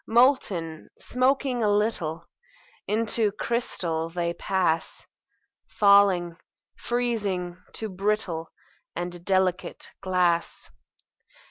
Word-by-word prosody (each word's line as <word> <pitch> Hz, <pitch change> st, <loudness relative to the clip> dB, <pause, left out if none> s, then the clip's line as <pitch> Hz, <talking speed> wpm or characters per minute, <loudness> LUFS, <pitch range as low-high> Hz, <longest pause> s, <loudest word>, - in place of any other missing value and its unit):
Molten, 210 Hz, -, +2 dB
smoking 255 Hz, 0 st, +1 dB
a 215 Hz, -, +3 dB
little, 205 Hz, -6 st, 0 dB, 0.6 s
Into 220 Hz, 0 st, +1 dB
crystal 170 Hz, -9 st, -2 dB
they 170 Hz, 0 st, -2 dB
pass; 180 Hz, -3 st, -1 dB, 0.6 s
Falling, 200 Hz, -5 st, +4 dB, 0.4 s
freezing, 200 Hz, -7 st, -2 dB
to 220 Hz, -, -3 dB
brittle 190 Hz, -4 st, -2 dB, 0.4 s
And 175 Hz, 0 st, -5 dB
delicate 190 Hz, -1 st, 0 dB
glass. 180 Hz, -3 st, 0 dB
190 Hz, 80 wpm, -26 LUFS, 175-220 Hz, 0.6 s, Falling